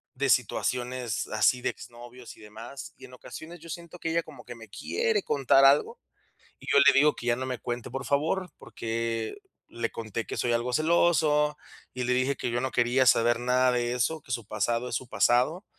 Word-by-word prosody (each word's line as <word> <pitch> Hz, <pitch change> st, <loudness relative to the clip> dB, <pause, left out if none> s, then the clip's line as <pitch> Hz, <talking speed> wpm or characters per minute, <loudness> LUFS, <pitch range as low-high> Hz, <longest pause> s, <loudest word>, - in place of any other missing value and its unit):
de 135 Hz, +1 st, -1 dB
situaciones, 125 Hz, -1 st, 0 dB
así, 115 Hz, +3 st, +2 dB
de -, -, 0 dB
exnovios 120 Hz, +1 st, -11 dB
y -, -, -18 dB
demás. 115 Hz, +6 st, -10 dB
Y -, -, -12 dB
en 125 Hz, -, -15 dB
ocasiones, 160 Hz, +6 st, -10 dB
yo 165 Hz, -, -12 dB
siento 170 Hz, +1 st, -8 dB
que 165 Hz, -, -3 dB
ella 170 Hz, +1 st, +1 dB
como 145 Hz, -6 st, -13 dB
que 120 Hz, -, -9 dB
me 115 Hz, -1 st, -12 dB
quiere 450 Hz, -, -1 dB
contar 135 Hz, -1 st, +3 dB
algo, 140 Hz, +2 st, +4 dB, 0.6 s
y -, -, -14 dB
yo -, -, +5 dB
le 140 Hz, 0 st, +7 dB
digo 150 Hz, +2 st, +5 dB
que 120 Hz, -, -8 dB
ya 120 Hz, -, +3 dB
no 130 Hz, +1 st, -4 dB
me 125 Hz, -2 st, -4 dB
cuente, 120 Hz, -1 st, -5 dB
por 135 Hz, 0 st, -5 dB
favor, 160 Hz, +6 st, 0 dB
porque 115 Hz, 0 st, -4 dB, 0.3 s
le 115 Hz, 0 st, -3 dB
conté 115 Hz, 0 st, -5 dB
que -, -, -6 dB
soy 120 Hz, -, 0 dB
algo 120 Hz, +2 st, -1 dB
celoso 155 Hz, -1 st, +2 dB, 0.4 s
y 125 Hz, -, -3 dB
le 125 Hz, -, +1 dB
dije 130 Hz, +2 st, +1 dB
que 120 Hz, -, -3 dB
yo 120 Hz, -, -1 dB
no 130 Hz, 0 st, -2 dB
quería 125 Hz, +2 st, +2 dB
saber 120 Hz, -1 st, +4 dB
nada 125 Hz, +1 st, +2 dB
de 120 Hz, 0 st, 0 dB
eso, 150 Hz, +6 st, -1 dB
que 125 Hz, -, -12 dB
su 115 Hz, -3 st, -3 dB
pasado 115 Hz, +4 st, -1 dB
es -, -, -3 dB
su 130 Hz, -, -4 dB
pasado. 125 Hz, -, +2 dB
125 Hz, 210 wpm, -27 LUFS, 120-145 Hz, 0.6 s, le